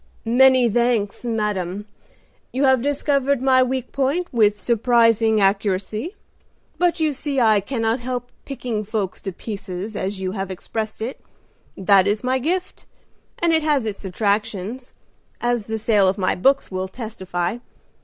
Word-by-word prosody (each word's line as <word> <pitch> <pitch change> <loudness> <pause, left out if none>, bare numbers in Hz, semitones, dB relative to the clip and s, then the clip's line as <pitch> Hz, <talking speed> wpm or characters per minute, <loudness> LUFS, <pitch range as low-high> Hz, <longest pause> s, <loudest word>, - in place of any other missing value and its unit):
"Many 255 +1 +5
thanks, 235 -3 0
madam; 210 -4 -2 0.7
you 265 +3 -1
have 265 -2 +4
discovered 280 -1 +1
my 260 0 +4
weak 255 0 -1
point 280 +6 0
with 210 -3 +3
surprising 230 -1 +3
accuracy. 205 - 0 0.6
But 355 -1 +2
you 310 -2 +1
see 280 0 -2
I 220 -3 +5
cannot 225 +2 -1
help 245 0 -4
'picking 245 -6 -4
folks 205 -3 -3
to 195 - -4
pieces,' 195 +1 -6
as 195 0 -3
you 185 -1 -2
have 195 -1 -4
expressed 215 +4 -4
it; 250 +4 -5 0.6
that 195 0 +4
is 210 +3 0
my 260 +1 +1
gift, 360 +7 -3 0.5
and 340 -1 +2
it 320 - +3
has 295 -5 +1
its 210 -2 -4
attractions, 205 +4 -2 0.4
as 240 -3 0
the 220 0 -2
sale 210 -3 +3
of 190 +2 +1
my 185 -2 +1
books 270 +7 +2
will 185 0 -2
testify. 190 -2 -4
225 Hz, 145 wpm, -22 LUFS, 200-260 Hz, 0.7 s, Many